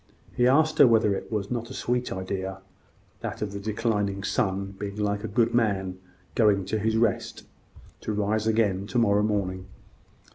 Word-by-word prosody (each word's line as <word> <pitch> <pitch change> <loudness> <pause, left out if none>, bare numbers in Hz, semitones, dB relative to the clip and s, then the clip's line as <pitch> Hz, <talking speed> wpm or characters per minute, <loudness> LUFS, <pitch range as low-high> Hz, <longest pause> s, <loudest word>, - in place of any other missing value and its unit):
He 125 - +3
asked 155 +4 +3
her 140 - +9
whether 110 -3 +4
it 95 - -5
was 105 -1 -2
not 120 -1 -3
a 130 - -8
sweet 125 0 -1
idea 95 0 -4 0.6
that - - -4
of 105 - -3
the 100 - -5
declining 105 -2 -1
sun 100 -4 -1
being 100 -1 -4
like 105 0 -1
a - - -2
good 115 +2 +1
man 95 -5 0 0.3
going 105 -4 +3
to 110 +3 -1
his 110 +1 +1
rest, 115 -2 0 0.6
to - - -4
rise 105 +1 0
again 105 -3 +1
to 120 - -2
morrow 105 -3 +4
morning. 95 -3 -1
105 Hz, 175 wpm, -26 LUFS, 100-115 Hz, 0.6 s, her